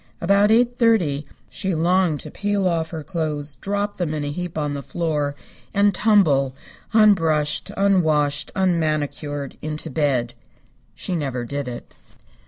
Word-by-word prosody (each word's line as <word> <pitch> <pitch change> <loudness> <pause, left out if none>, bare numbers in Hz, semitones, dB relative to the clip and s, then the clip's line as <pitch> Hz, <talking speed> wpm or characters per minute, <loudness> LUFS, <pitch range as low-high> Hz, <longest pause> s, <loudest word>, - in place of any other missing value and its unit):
About 200 +4 +3
eight 240 +2 +4
thirty 180 - +2 0.2
she 190 -3 -3
longed 170 -1 +2
to - - -7
peel 205 -1 0
off 165 -2 0
her 160 -2 -6
clothes, 150 -4 -3
drop 205 +1 -2
them 160 -4 -2
in 150 - -3
a 145 - -3
heap 175 +1 -5
on 150 -2 -1
the 140 - -4
floor, 150 -1 -2 0.4
and 200 0 +4
tumble, 155 -12 +3 0.4
unbrushed, 165 -9 +3
unwashed, 155 -7 +2
unmanicured, 155 -5 -1
into 155 0 -4
bed. 130 -6 0 0.6
She 185 - -4
never 135 -6 -3
did 140 +2 -4
it. 120 -1 -8
160 Hz, 140 wpm, -22 LUFS, 145-195 Hz, 0.6 s, eight